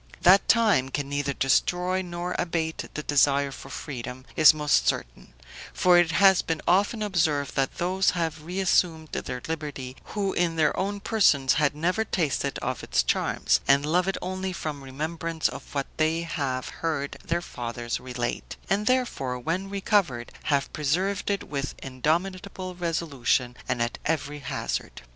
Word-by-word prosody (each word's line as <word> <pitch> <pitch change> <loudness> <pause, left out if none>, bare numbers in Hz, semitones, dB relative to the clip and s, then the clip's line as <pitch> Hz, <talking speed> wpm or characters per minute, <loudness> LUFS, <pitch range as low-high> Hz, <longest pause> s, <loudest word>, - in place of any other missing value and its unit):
"That 190 +2 +6
time 210 - +4
can 140 +1 -3
neither 145 0 -1
destroy 180 +7 +1
nor 175 0 -4
abate 165 -2 -2
the 150 - -3
desire 140 -1 +3
for - - -10
freedom 125 -1 -6
is 155 - +9
most 150 -2 +2
certain; - - -3 0.4
for 180 -1 +5
it 175 -2 +3
has 190 0 +6
been 165 -1 -2
often 205 +5 +2
observed, 160 -8 +1
that 135 -1 0
those 185 +2 +2
have 160 -2 -2
reassumed 175 -2 +1
their 125 -1 -5
liberty 145 -5 -5
who 200 -2 -2
in 170 -2 +1
their 155 -2 +2
own 200 +1 -2
persons 155 - +3
had 145 -1 +2
never 180 +8 +1
tasted 150 -9 -1
of - - -2
its - - +1
charms, - - +1
and 140 +1 +4
love 175 +4 +2
it 195 - 0
only 185 0 -3
from 150 -5 -5
remembrance 160 +4 -2
of - - -8
what 140 -1 0
they 160 +1 +1
have 135 -6 -2
heard 150 -4 -2
their 170 +1 0
fathers 120 -3 -4
relate; 125 -1 -4
and, 205 +2 +1
therefore, 240 - 0
when 170 +10 -2
recovered, 195 - 0
have 140 -2 0
preserved 185 +8 0
it 200 -1 0
with 140 -1 -4
indomitable 180 +7 -2
resolution 150 -8 0
and 120 -1 +1
at 120 - -4
every 150 -2 -2
hazard. 140 - -4
160 Hz, 155 wpm, -26 LUFS, 140-185 Hz, 0.4 s, is